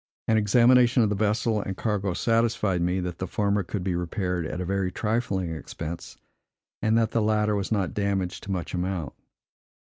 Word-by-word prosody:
An 110 - +3
examination 120 +3 +5
of 110 - +2
the 105 - 0
vessel 110 +1 +1
and 95 -1 -5
cargo 100 -4 -1
satisfied 115 -5 +1
me, 90 +2 +1
that 90 -1 -5
the 95 - -3
former 100 +2 +1
could 95 +1 -4
be 95 -1 -1
repaired 90 -1 -2
at 90 - -5
very 95 0 -1
trifling 100 -5 -1
expense, 80 +1 -7 0.6
and 110 +1 +3
that 115 -1 +2
the 115 - +1
latter 105 0 +2
was 100 +1 -2
not 100 -5 0
damaged 100 -3 -1
to 100 - -4
much 90 -3 -3
amount. 90 -3 -2
100 Hz, 175 wpm, -26 LUFS, 90-110 Hz, 0.6 s, examination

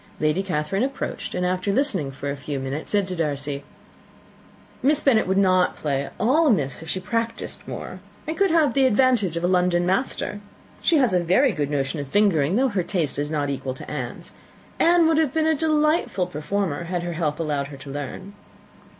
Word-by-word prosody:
Lady 155 +4 +1
Catherine 180 +1 -1
approached, 275 +2 -3
and, 180 0 0
after 185 +2 0
listening 195 - 0
for 135 +1 -5
a - - -3
few 140 0 -5
minutes, 135 +3 -4
said 205 -2 +1
to 185 - -4
Darcy, 145 -3 -2 1.2
"Miss 290 +2 +3
Bennet 240 -10 +3
would 190 +1 +1
not 185 -2 +3
play 140 -3 -1
at - - -11
all 300 +8 +3
amiss 145 - +1
if 165 - -9
she 185 - -1
practised 230 +4 -3
more, 185 - -6 0.3
and 315 - -3
could 395 +1 +2
have 315 -6 +3
the 270 -1 +4
advantage 225 -8 +2
of 170 - -3
a - - +3
London 180 -1 +2
master. 205 +1 -1 0.4
She 335 - +3
has 255 -8 +3
a 180 -1 +2
very 190 +11 +4
good 145 -6 -2
notion 145 +1 -1
of 140 - -4
fingering, 175 -2 +2
though 260 +3 +3
her 200 -4 0
taste 170 -6 -2
is 145 +1 -2
not 145 -2 -1
equal 130 -1 -4
to - - -9
Anne's. - - -6 0.5
Anne 340 0 +5
would 320 -1 +3
have 310 -3 0
been 315 -1 +2
a 320 - +4
delightful 305 - +1
performer, 175 -1 -2
had 175 0 -2
her 175 0 -3
health 155 -2 -2
allowed 145 -3 -1
her 140 -1 -10
to 135 +1 -9
learn." 145 +8 -6
185 Hz, 200 wpm, -23 LUFS, 150-250 Hz, 1.2 s, Anne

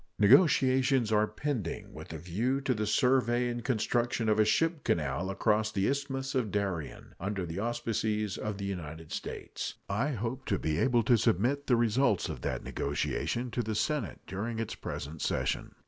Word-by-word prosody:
Negotiations 130 - +5
are 105 0 +4
pending 110 - -4
with - - -9
a 80 - -5
view 105 - -1
to 135 -1 +1
the 105 -2 -2
survey 125 0 +3
and 120 -1 -4
construction 120 -1 0
of 110 0 +3
a 110 - +6
ship 165 +6 +1
canal 75 +3 0
across 105 +2 +1
the 95 -2 +1
Isthmus 135 -1 -2
of 125 -5 0
Darien, 95 -8 -3
under 95 0 -2
the 85 +3 -5
auspices 110 -2 -1
of 105 -2 -4
the 100 - -4
United 80 -4 -6
States. - - -5
I 110 +9 0
hope 120 +4 -4
to 100 - +1
be 80 0 -1
able 120 -3 +3
to 120 +1 +4
submit 120 +6 +1
the 125 - +5
results 115 -2 +2
of - - -5
that - - -2
negotiation 115 - -2
to 120 - 0
the 110 -1 -3
Senate 140 +1 -1
during 110 +5 -4
its 115 -1 -3
present 75 +3 -6
session. - - -1
110 Hz, 175 wpm, -30 LUFS, 100-125 Hz, -, a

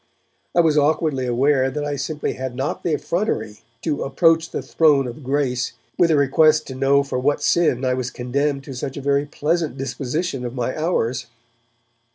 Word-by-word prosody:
I 175 - +6
was 155 -2 +3
awkwardly 145 -3 +1
aware 130 +2 +2
that 145 +3 -3
I 145 0 -2
simply 150 +2 -3
had 130 -1 -5
not 135 +3 -2
the 165 -3 0
effrontery 170 - -2 0.2
to 150 -3 -1
'approach 165 +4 +2
the - - -4
Throne 150 -4 +3
of 125 +4 -8
Grace' 130 -2 -1 0.2
with 175 - +3
a 160 - +4
request 155 +3 +4
to - - -5
know 135 +2 +3
for 135 -2 -3
what 145 +3 0
sin 155 -7 +2
I 130 - +2
was 125 -1 -2
condemned 135 +3 -2
to 135 - -8
such 130 +2 -5
a - - -3
very 140 +1 +1
pleasant 155 0 -1
disposition 135 +2 -3
of 120 +1 -5
my 125 0 -2
hours. 130 -7 -1
140 Hz, 185 wpm, -21 LUFS, 130-155 Hz, 0.2 s, I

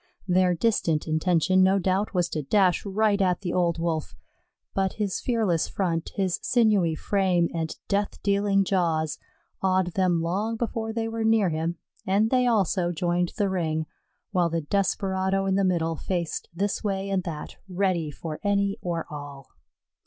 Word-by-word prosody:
Their 180 -1 +3
distant 165 -6 +1
intention 175 +3 +2
no 190 +1 +4
doubt 190 +2 0
was 180 -3 +1
to 155 - -2
dash 185 +4 +2
right 205 0 +2
at 180 -1 +1
the 175 -3 -3
old 175 -2 +1
Wolf; 160 - -2 0.6
but 190 -1 0
his 205 -3 -2
fearless 215 -9 +1
front, 170 -4 -2
his 190 -3 0
sinewy 210 -9 +3
frame 185 -2 +1
and 160 -1 -3
death 200 0 -1
dealing 200 0 +2
jaws, 165 -5 0 0.4
awed 185 -2 +1
them 185 -3 +2
long 195 +7 -1
before 225 -1 -3
they 225 0 -2
were 225 0 -3
near 220 -4 +3
him, 165 +2 -2 0.3
and 205 +4 +2
they 250 -1 +3
also 190 -6 +2
joined 175 +1 0
the 205 -3 +2
ring, 160 -4 -1 0.5
while 180 -4 +2
the 165 0 -1
desperado 190 +2 0
in 195 - +1
the 195 +1 +2
middle 165 -3 +1
faced 170 0 -3
this 195 +4 -2
way 195 -1 -1
and 190 -1 +1
that, 155 -4 -6
ready 180 -4 0
for 155 +2 -6
any 200 0 +1
or 170 -2 -2
all. 145 -2 -9
185 Hz, 160 wpm, -26 LUFS, 170-200 Hz, 0.6 s, no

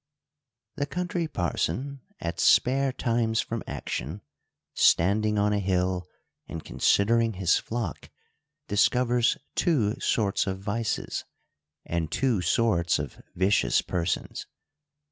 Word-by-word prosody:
The 145 -1 -1
Country 175 -1 -2
Parson, 130 - -2 0.2
at 85 0 -4
spare 135 +2 +4
times 115 -2 0
from 115 -1 -2
action, 80 +11 -5 0.5
standing 105 +5 +3
on 105 0 +2
a 105 - +1
hill 90 -1 0 0.4
and 80 - -7
considering 115 +2 +2
his 90 -2 +2
flock, 110 -8 -5 0.6
discovers 120 +2 +2 0.2
two 120 -11 +1
sorts 100 -3 +1
of 95 0 -2
vices, 105 +3 -2 0.6
and 85 -2 -2
two 125 -8 +1
sorts 85 -2 +2
of 75 -1 -6
vicious 95 +3 +2
persons. 90 -2 -3
105 Hz, 105 wpm, -27 LUFS, 90-120 Hz, 0.6 s, spare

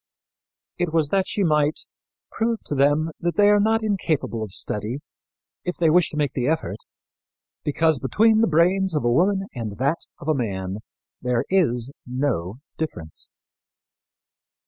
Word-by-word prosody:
It 175 -2 0
was 160 -3 +2
that 195 +1 +1
she 205 - -1
might 150 -2 +2 0.5
"prove 225 0 -1
to - - -3
them 145 +3 +2
that 175 0 -1
they 205 0 +5
are 205 - +5
not 220 +2 +2
incapable 165 - -1
of 110 -3 -5
study, 105 +5 -3 0.7
if 180 - -3
they 165 -2 +3
wish 175 0 +4
to 150 - -7
make 145 -3 0
the 125 -1 -1
effort, 160 +1 -1 0.9
because 155 0 +2
between 220 - +3
the 230 - +4
brain 180 +4 +3
of 150 - 0
a 120 - +3
woman 195 +8 +2
and 110 -5 -5
that 140 +6 0 0.2
of 145 - -10
a 155 - +4
man 95 -7 -3 0.4
there 125 -2 0
is 130 -10 +2 0.2
no 125 -8 -1 0.2
difference." 85 - -4
155 Hz, 155 wpm, -23 LUFS, 125-185 Hz, 0.9 s, they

